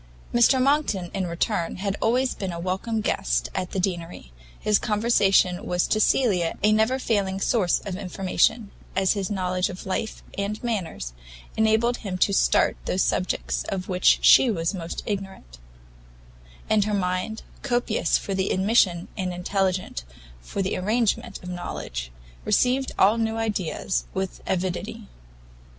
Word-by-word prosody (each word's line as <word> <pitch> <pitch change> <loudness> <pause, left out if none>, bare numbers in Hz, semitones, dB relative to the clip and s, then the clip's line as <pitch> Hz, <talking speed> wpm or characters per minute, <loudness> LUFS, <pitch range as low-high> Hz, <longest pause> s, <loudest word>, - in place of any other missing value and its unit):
Mr 240 +3 +5
Monckton, 255 - +1
in 190 -2 -1
return, 170 0 -1
had 195 +1 -2
always 250 +3 +2
been 195 -2 -4
a 170 - -5
welcome 190 +6 -2
guest - - 0
at 180 - -2
the 195 - -3
Deanery; 175 - -3 0.3
his 210 -1 +2
conversation 205 -5 +2
was 180 0 0
to 215 - +1
Cecilia 200 -8 +2
a 210 - +5
never 220 +4 +3
failing 200 -6 0
source 195 -3 +2
of 190 - -5
information, 195 +3 0 0.2
as 190 0 +3
his 195 -2 -3
knowledge 185 -2 -1
of 185 - -8
life 200 +3 -3
and 200 +3 -3
manners 180 - -3 0.4
enabled 220 +2 +2
him 190 -4 -5
to 200 - +2
start 195 - +3
those - - +1
subjects - - -1
of 185 -1 -4
which 180 -1 +4
she 260 - +7
was 170 -3 -1
most 170 -3 -5
ignorant; 190 - -6 1.1
and 210 -2 +3
her 210 -1 0
mind, 185 +3 -2 0.2
copious 240 -4 +1
for 195 - -4
the 190 0 0
admission 190 -3 +2
and 185 -3 -2
intelligent 185 - -1 0.4
for 195 - -3
the 190 - -1
arrangement 215 +4 0
of - - -8
knowledge, - - -5 0.3
received 260 - +2
all 210 +4 +4
new 225 0 0
ideas 200 -5 -2
with 190 -1 -3
avidity. 190 +4 -2
195 Hz, 145 wpm, -25 LUFS, 180-220 Hz, 1.1 s, she